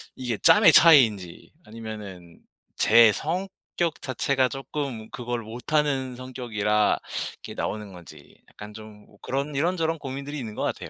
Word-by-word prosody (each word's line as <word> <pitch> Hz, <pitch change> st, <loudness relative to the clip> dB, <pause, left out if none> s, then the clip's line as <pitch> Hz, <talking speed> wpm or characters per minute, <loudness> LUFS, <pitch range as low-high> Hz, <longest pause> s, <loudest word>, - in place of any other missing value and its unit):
이게 125 Hz, -4 st, -3 dB
짬의 210 Hz, -, +6 dB
차이인지 110 Hz, -, +4 dB
아니면은 105 Hz, -6 st, -10 dB, 0.4 s
제 115 Hz, 0 st, +6 dB
성격 175 Hz, -, -4 dB
자체가 130 Hz, 0 st, 0 dB
쪼끔 135 Hz, -4 st, -5 dB
그걸 120 Hz, -1 st, -4 dB
못하는 130 Hz, +3 st, -2 dB
성격이라 115 Hz, -5 st, -1 dB, 0.4 s
이렇게 -, -, -9 dB
나오는 105 Hz, -2 st, -4 dB
건지 90 Hz, -2 st, -14 dB
약간 105 Hz, 0 st, -11 dB
좀 105 Hz, -1 st, -13 dB
뭐 100 Hz, -, -22 dB
그런 140 Hz, +3 st, -3 dB
이런저런 165 Hz, +2 st, 0 dB
고민들이 140 Hz, +2 st, -6 dB
있는 110 Hz, -5 st, -7 dB
것 -, -, -3 dB
같아요. -, -, -4 dB
125 Hz, 315 characters per minute, -25 LUFS, 105-145 Hz, 0.4 s, 짬의